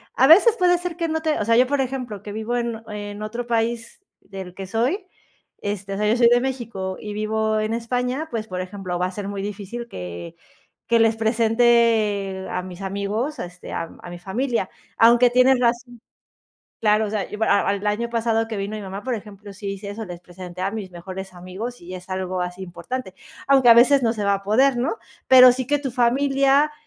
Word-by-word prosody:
a 265 Hz, -, +5 dB
veces 415 Hz, -, +7 dB
puede 355 Hz, -1 st, +4 dB
ser 350 Hz, -1 st, -5 dB
que 335 Hz, -1 st, -1 dB
no 320 Hz, 0 st, -1 dB
te 315 Hz, -1 st, 0 dB
o 210 Hz, -, -1 dB
sea, 230 Hz, +1 st, +3 dB
yo 250 Hz, +1 st, +5 dB
por 280 Hz, 0 st, +1 dB
ejemplo, 250 Hz, -6 st, -4 dB
que 205 Hz, -, -7 dB
vivo 220 Hz, +3 st, -3 dB
en 235 Hz, -2 st, -3 dB
en 205 Hz, 0 st, -6 dB
otro 235 Hz, +3 st, -5 dB
país 230 Hz, +3 st, -2 dB, 0.2 s
del 190 Hz, -2 st, -9 dB
que 195 Hz, 0 st, -7 dB
soy, 255 Hz, -, -1 dB, 0.5 s
este, 200 Hz, -1 st, -4 dB
o -, -, -3 dB
sea, 210 Hz, +1 st, 0 dB
yo 225 Hz, -, +2 dB
soy 235 Hz, -1 st, +6 dB
de 240 Hz, 0 st, +4 dB
México 230 Hz, -8 st, -4 dB
y 210 Hz, -1 st, -6 dB
vivo 215 Hz, +1 st, 0 dB
en 215 Hz, +1 st, -1 dB
España, 250 Hz, +5 st, -2 dB
pues, 220 Hz, -2 st, -3 dB
por 185 Hz, -2 st, -4 dB
ejemplo, 185 Hz, -1 st, -5 dB
va 180 Hz, -, +1 dB
a -, -, -7 dB
ser 195 Hz, +1 st, -6 dB
muy 200 Hz, -1 st, -4 dB
difícil 210 Hz, +4 st, -6 dB
que 85 Hz, -, -8 dB, 0.5 s
que 230 Hz, -1 st, +4 dB
les 225 Hz, 0 st, +3 dB
presente 225 Hz, -4 st, +2 dB
a 180 Hz, -, -3 dB
mis 180 Hz, 0 st, -10 dB
amigos, 200 Hz, +9 st, -3 dB
este, 180 Hz, 0 st, -8 dB
a 165 Hz, -, -4 dB
a 175 Hz, -, -9 dB
mi 175 Hz, -, -8 dB
familia, 225 Hz, +3 st, -2 dB, 0.3 s
aunque 240 Hz, +2 st, +6 dB
tienes 255 Hz, +1 st, +4 dB
razón. 240 Hz, 0 st, -1 dB, 0.8 s
Claro, 215 Hz, 0 st, +3 dB
o -, -, -5 dB
sea, 210 Hz, -2 st, -2 dB
yo 210 Hz, -, -6 dB
al -, -, +1 dB, 0.4 s
al -, -, +1 dB
año 220 Hz, +3 st, -1 dB
pasado 225 Hz, -1 st, 0 dB
que 225 Hz, -2 st, -5 dB
vino 200 Hz, +2 st, -3 dB
mi 215 Hz, -, -6 dB
mamá, 195 Hz, +1 st, -7 dB
por 255 Hz, -, -2 dB
ejemplo, 205 Hz, -1 st, -10 dB
sí 200 Hz, +1 st, -8 dB
hice 200 Hz, +1 st, -8 dB
eso, 220 Hz, +2 st, -6 dB
les 175 Hz, -2 st, -8 dB
presenté 180 Hz, 0 st, -10 dB
a 195 Hz, +1 st, -1 dB
mis 210 Hz, -3 st, -5 dB
mejores 185 Hz, +2 st, -8 dB
amigos 190 Hz, +8 st, -7 dB
y 175 Hz, +2 st, -10 dB
es 180 Hz, 0 st, -9 dB
algo 185 Hz, -1 st, -2 dB
así 180 Hz, +1 st, -5 dB
importante. 190 Hz, +4 st, -6 dB, 0.3 s
Aunque 270 Hz, -3 st, +5 dB
a 230 Hz, -, +9 dB
veces 265 Hz, +4 st, +6 dB
no 225 Hz, -1 st, +2 dB
se 215 Hz, -3 st, -4 dB
va 200 Hz, 0 st, +3 dB
a 195 Hz, -, -7 dB
poder, 250 Hz, +6 st, +3 dB
¿no? 270 Hz, -, -1 dB, 0.3 s
Pero 255 Hz, -1 st, +9 dB
sí 255 Hz, 0 st, -3 dB
que 290 Hz, +1 st, +2 dB
tu 275 Hz, -2 st, -4 dB
familia, 275 Hz, +4 st, +3 dB
220 Hz, 215 wpm, -22 LUFS, 195-245 Hz, 0.8 s, a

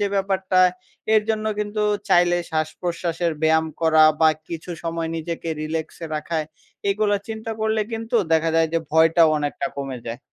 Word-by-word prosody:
যে 205 Hz, -, +2 dB
ব্যাপারটা 190 Hz, -1 st, 0 dB, 0.6 s
এর 215 Hz, -, +5 dB
জন্য 215 Hz, 0 st, -1 dB
কিন্তু 210 Hz, 0 st, -2 dB, 0.3 s
চাইলে 175 Hz, -1 st, +4 dB
শ্বাসপ্রশ্বাসের 170 Hz, +1 st, -2 dB
ব্যায়াম 160 Hz, 0 st, +3 dB
করা 160 Hz, -1 st, +5 dB, 0.2 s
বা 160 Hz, -, +7 dB, 0.2 s
কিছু 170 Hz, +1 st, -6 dB
সময় 165 Hz, -1 st, -3 dB
নিজেকে 165 Hz, +1 st, -5 dB
রিল্যাক্সে 160 Hz, +1 st, -4 dB
রাখা, 160 Hz, +2 st, -3 dB, 0.5 s
এগুলো 205 Hz, 0 st, +1 dB
চিন্তা 220 Hz, 0 st, -5 dB
করলে 220 Hz, 0 st, +1 dB
কিন্তু 225 Hz, +1 st, -1 dB, 0.2 s
দেখা 160 Hz, 0 st, +3 dB
যায় 165 Hz, -1 st, +3 dB
যে 165 Hz, -, +2 dB
ভয়টাও 160 Hz, +1 st, +5 dB
অনেকটা 145 Hz, -1 st, -2 dB
কমে 135 Hz, -2 st, -4 dB
যায়। 115 Hz, +1 st, -5 dB
165 Hz, 150 wpm, -22 LUFS, 160-195 Hz, 0.6 s, বা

